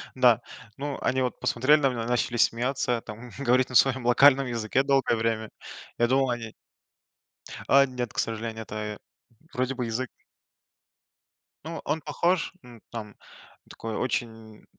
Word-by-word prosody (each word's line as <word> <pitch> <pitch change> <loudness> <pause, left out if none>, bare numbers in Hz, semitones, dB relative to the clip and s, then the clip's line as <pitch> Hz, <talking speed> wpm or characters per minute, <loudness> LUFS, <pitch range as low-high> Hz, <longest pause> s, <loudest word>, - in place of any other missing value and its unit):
Да, 120 -2 +5 0.4
ну 140 0 -4
они 130 0 +1
вот 125 - -2
посмотрели 145 +6 +3
на 135 -2 +3
меня, 115 -2 -3
начали 120 0 0
смеяться, 120 0 +1
там 115 +2 -10
говорить 130 -1 +2
на 125 - -7
своем 130 -2 +4
локальном 135 +2 +6
языке 120 +2 0
долгое 135 -4 +2
время. 110 -1 -1 0.5
Я 120 - +3
думал 135 0 +2
они 115 -2 -4 1.1
А 140 0 +6
нет, 125 -3 -5
к - - -16
сожалению, 110 0 -3
это 110 - -9
й 105 -1 -4 0.6
вроде 130 +1 -1
бы 125 -2 -2
язык 115 +3 -3 1.6
Ну 165 +1 -6
он 155 +2 -1
похож 170 +5 0
н 120 -3 -14
там. 105 -3 -7 0.5
Такой, 115 -1 -6
очень 115 -3 -4
125 Hz, 145 wpm, -26 LUFS, 115-135 Hz, 1.6 s, локальном